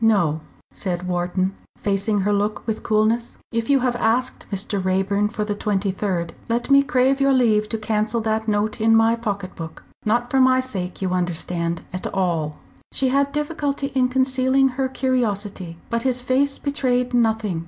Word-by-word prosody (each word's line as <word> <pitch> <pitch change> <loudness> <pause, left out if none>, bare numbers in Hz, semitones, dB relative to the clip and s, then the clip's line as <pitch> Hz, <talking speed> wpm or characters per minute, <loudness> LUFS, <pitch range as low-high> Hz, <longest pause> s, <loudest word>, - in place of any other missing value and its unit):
"No," 175 -9 +3 0.3
said 180 -2 -3
Wharton, 180 +2 0 0.2
facing 200 +1 0
her 205 +2 +1
look 205 +1 -1
with 220 -2 -2
coolness. 220 +2 +1
"If 230 +1 -2
you 275 -2 +4
have 250 -1 +1
asked 240 +2 0
Mr. 195 0 -2
Raeburn 195 +2 +1
for 210 -1 -3
the 210 - -1
23rd, 195 -4 -1 0.2
let 235 +4 -1
me 275 0 +8
crave 265 +1 +2
your 275 0 +4
leave 215 -5 +3
to 225 - -2
cancel 215 +1 0
that 220 0 -1
note 210 +1 0
in 225 0 +5
my 225 +1 +4
pocket 200 -5 -4
book. 165 -1 -8 0.2
Not 240 +3 0
for 265 - +4
my 255 0 +5
sake, 195 -8 -4
you 185 - 0
understand, 170 -1 -1
at 185 - -3
all." 165 -5 0 0.3
She 265 - +1
had 280 +1 +2
difficulty 290 -2 -2
in 255 -2 +3
concealing 260 +1 +2
her 260 +1 -2
curiosity. 205 -9 -2
But 230 0 0
his 250 -1 -1
face 275 +2 +1
betrayed 250 -3 0
nothing. 220 -6 +1
220 Hz, 170 wpm, -22 LUFS, 195-255 Hz, 0.3 s, me